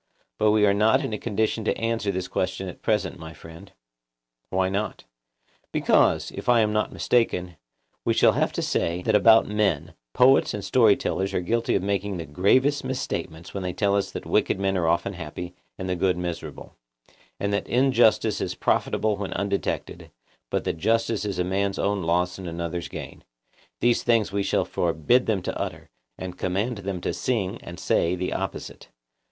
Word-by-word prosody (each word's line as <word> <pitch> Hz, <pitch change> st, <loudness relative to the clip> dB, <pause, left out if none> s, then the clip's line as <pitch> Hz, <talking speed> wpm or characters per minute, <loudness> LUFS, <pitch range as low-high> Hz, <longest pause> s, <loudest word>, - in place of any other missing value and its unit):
But 110 Hz, -, +4 dB
we 105 Hz, 0 st, +4 dB
are 100 Hz, -, +4 dB
not 110 Hz, +2 st, +3 dB
in -, -, -4 dB
a 105 Hz, -, -3 dB
condition 110 Hz, 0 st, -1 dB
to -, -, 0 dB
answer 115 Hz, -3 st, -1 dB
this 95 Hz, -1 st, -3 dB
question 95 Hz, +1 st, -2 dB
at 90 Hz, -, -9 dB
present, 105 Hz, -4 st, 0 dB
my 80 Hz, 0 st, -9 dB
friend. 85 Hz, +4 st, -13 dB, 0.8 s
Why 95 Hz, 0 st, +1 dB
not? 100 Hz, +3 st, -3 dB, 0.7 s
Because, -, -, +2 dB
if -, -, -5 dB
I 120 Hz, -2 st, +6 dB
am 105 Hz, -1 st, +1 dB
not 105 Hz, -, 0 dB
mistaken, 90 Hz, -7 st, 0 dB, 0.5 s
we -, -, +1 dB
shall -, -, +5 dB
have -, -, 0 dB
to -, -, -2 dB
say 85 Hz, +2 st, -1 dB
that 110 Hz, -, +1 dB
about 110 Hz, +2 st, +6 dB
men 105 Hz, -8 st, 0 dB, 0.2 s
poets 130 Hz, -3 st, +5 dB
and 105 Hz, -, -5 dB
story 110 Hz, -5 st, +5 dB
tellers 95 Hz, 0 st, -2 dB
are -, -, +2 dB
guilty 115 Hz, +6 st, 0 dB
of 95 Hz, -, 0 dB
making 100 Hz, -1 st, -1 dB
the 85 Hz, -, -5 dB
gravest 130 Hz, -, +2 dB
misstatements 125 Hz, -11 st, -4 dB
when 100 Hz, -, -3 dB
they 90 Hz, -1 st, -3 dB
tell 100 Hz, -1 st, +1 dB
us 100 Hz, -1 st, 0 dB
that -, -, -7 dB
wicked -, -, +1 dB
men 95 Hz, 0 st, 0 dB
are 85 Hz, -3 st, +1 dB
often 85 Hz, +4 st, +1 dB
happy, 90 Hz, +1 st, -7 dB, 0.2 s
and 95 Hz, -, -5 dB
the 90 Hz, -, 0 dB
good 90 Hz, 0 st, +1 dB
miserable; 90 Hz, -1 st, -6 dB, 0.6 s
and 100 Hz, 0 st, -1 dB
that 100 Hz, -, -1 dB
injustice 120 Hz, -4 st, +3 dB
is -, -, -2 dB
profitable 110 Hz, -2 st, 0 dB
when 100 Hz, -1 st, -4 dB
undetected, 100 Hz, 0 st, -3 dB, 0.4 s
but -, -, -1 dB
that -, -, -2 dB
justice 115 Hz, +2 st, +1 dB
is 100 Hz, -3 st, -3 dB
a 90 Hz, -, +1 dB
man's 95 Hz, +2 st, -1 dB
own 100 Hz, 0 st, 0 dB
loss 90 Hz, +2 st, 0 dB
and 95 Hz, -, -6 dB
another's 85 Hz, +1 st, -4 dB
gain—these -, -, -4 dB
things 115 Hz, -4 st, +2 dB
we 100 Hz, 0 st, 0 dB
shall 100 Hz, -, +1 dB
forbid 85 Hz, +9 st, +1 dB
them 100 Hz, -5 st, 0 dB
to -, -, -3 dB
utter, -, -, -6 dB, 0.3 s
and 90 Hz, -1 st, -7 dB
command 100 Hz, +5 st, -1 dB
them 95 Hz, -2 st, -4 dB
to -, -, -2 dB
sing 115 Hz, -4 st, -1 dB
and 85 Hz, 0 st, -9 dB
say 85 Hz, +2 st, +1 dB
the 90 Hz, 0 st, -3 dB
opposite. -, -, -5 dB
100 Hz, 185 wpm, -25 LUFS, 90-110 Hz, 0.8 s, I